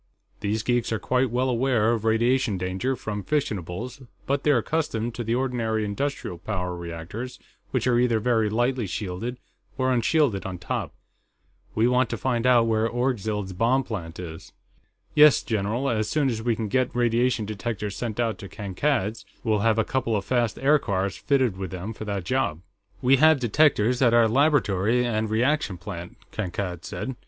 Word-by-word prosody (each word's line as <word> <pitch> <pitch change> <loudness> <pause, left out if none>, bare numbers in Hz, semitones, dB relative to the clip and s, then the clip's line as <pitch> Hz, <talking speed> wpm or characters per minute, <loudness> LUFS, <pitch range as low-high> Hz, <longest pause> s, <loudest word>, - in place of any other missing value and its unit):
These 110 +2 -1
geeks 120 -1 0
are 110 - +1
quite 125 +3 +1
well 125 +3 0
aware 120 -3 +2
of 115 -2 -1
radiation 115 0 +2
danger 95 +9 -1
from 105 -3 -4
fissionables, 120 - -3 0.2
but 140 0 0
they're 145 -3 +3
accustomed 120 -4 -1
to 120 - -4
the 115 +1 0
ordinary 115 -4 -1
industrial 105 -5 -3
power 90 -2 -3
reactors, 85 +8 -6 0.3
which - - -1
are 120 -1 +3
either 120 -2 +2
very 110 -2 +2
lightly 120 +1 0
shielded 100 +6 -4 0.4
or 130 -1 +2
unshielded 125 -3 +2
on 95 -2 -5
top. 90 - -4 0.8
We 110 +2 +3
want 125 -1 +2
to 115 - -3
find 125 0 0
out 120 -2 +5
where 110 0 +1
Orgzild's 110 -6 -1
bomb 120 +8 +2
plant 90 -9 -6
is." 80 -3 -8 0.6
"Yes, 150 -1 +6
general, 110 +4 -1
as 110 -4 0
soon 145 -4 +1
as 110 -1 -3
we 115 0 +1
can 110 -1 -3
get 125 +3 0
radiation 120 -1 +2
detectors 105 -1 -4
sent 115 -2 -4
out 115 -2 0
to 100 - -8
Kankad's, 105 +1 -1 0.2
we'll 110 -2 +1
have 115 +1 +2
a 110 - +3
couple 130 -4 0
of 100 -1 -2
fast 120 -3 0
aircars 100 -10 +1
fitted 130 -8 +1
with 95 -2 -4
them 95 +5 -5
for 110 - -8
that 100 -3 -3
job." 110 -8 -1 0.4
"We 130 +2 +5
have 155 +1 +5
detectors, 125 -1 +3
at 120 -2 +5
our 115 -1 +6
laboratory 125 -4 +2
and 110 -2 -1
reaction 120 - +1
plant," 85 +1 -8
Kankad 90 -3 -4
said. 130 - -5
115 Hz, 170 wpm, -25 LUFS, 105-125 Hz, 0.8 s, Yes